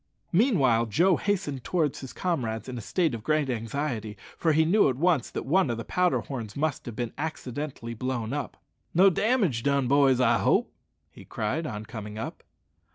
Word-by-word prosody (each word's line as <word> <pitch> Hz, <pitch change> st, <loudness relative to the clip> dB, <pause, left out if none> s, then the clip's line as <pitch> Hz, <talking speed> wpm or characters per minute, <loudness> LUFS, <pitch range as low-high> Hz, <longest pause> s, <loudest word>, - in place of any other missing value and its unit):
Meanwhile 140 Hz, -, +3 dB
Joe 170 Hz, -, +3 dB
hastened 175 Hz, -11 st, -2 dB
towards 160 Hz, -6 st, 0 dB
his 135 Hz, -, -8 dB
comrades 125 Hz, -12 st, -2 dB
in 130 Hz, -, -5 dB
a 120 Hz, -, -5 dB
state 160 Hz, -, 0 dB
of 115 Hz, -, -4 dB
great 150 Hz, -1 st, +1 dB
anxiety, 115 Hz, -2 st, -3 dB, 0.2 s
for 165 Hz, -, +1 dB
he 160 Hz, +1 st, +4 dB
knew 190 Hz, 0 st, +4 dB
at 130 Hz, -, -1 dB
once 155 Hz, -3 st, +2 dB
that -, -, -5 dB
one 170 Hz, +2 st, +3 dB
of 120 Hz, -, -1 dB
the 115 Hz, -, -6 dB
powder 180 Hz, -1 st, +1 dB
horns 115 Hz, -6 st, -6 dB
must 145 Hz, -3 st, -1 dB
have 120 Hz, -, -6 dB
been 120 Hz, -1 st, -3 dB
accidentally 145 Hz, -5 st, -5 dB
blown 120 Hz, 0 st, -3 dB
up. 145 Hz, -, -4 dB, 0.4 s
"No 190 Hz, +3 st, +7 dB
damage 200 Hz, -, +1 dB
done, 140 Hz, 0 st, +1 dB
boys, 135 Hz, -1 st, +4 dB
I 120 Hz, -2 st, +4 dB
hope?" -, -, +2 dB, 0.4 s
he -, -, -13 dB
cried 135 Hz, +10 st, -2 dB
on 105 Hz, -3 st, -5 dB
coming 105 Hz, -1 st, -7 dB
up. 110 Hz, -, -6 dB
135 Hz, 185 wpm, -27 LUFS, 115-160 Hz, 0.4 s, No